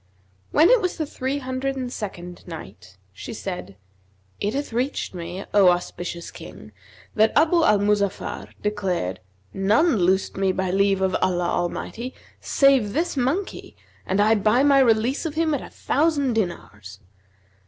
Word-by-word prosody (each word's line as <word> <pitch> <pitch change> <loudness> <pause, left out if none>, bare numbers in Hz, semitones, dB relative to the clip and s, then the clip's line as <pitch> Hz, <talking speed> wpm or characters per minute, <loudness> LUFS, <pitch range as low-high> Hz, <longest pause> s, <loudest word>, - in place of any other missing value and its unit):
When 315 +7 +5
it - - +5
was 365 -2 -2
the 315 - -1
Three 270 -1 -3
Hundred 260 0 -3
and 255 -2 -4
Second 180 -5 -7
Night, 100 - -10 0.2
She - - -8
said, 90 +2 -6 0.6
It 205 +4 -1
hath 285 -4 -3
reached 255 0 -2
me, 175 +2 -6
O 200 -3 +6
auspicious 175 -1 -3
King, - - -11 0.4
that 220 +1 +3
Abu 330 +2 +4
al 210 -8 +5
Muzaffar 200 -1 -1 0.2
declared, 185 - -2 0.3
"None 220 - +3
loosed 190 +1 +1
me, 195 -1 +1
by 185 -1 -1
leave 195 0 +2
of 190 -1 +1
Allah 175 -2 +1
Al 175 0 0
mighty, 240 +8 -6 0.2
save 270 -7 +3
this 335 +3 -1
monkey 280 +10 -2 0.3
and 190 +2 -1
I 215 +2 +5
buy 215 +4 +3
my 280 -1 +5
release 245 +5 +2
of 305 - -7
him 320 -1 +1
at 285 - -1
a - - -9
thousand 285 -3 0
dinars!" 105 - -4
210 Hz, 155 wpm, -23 LUFS, 185-275 Hz, 0.6 s, O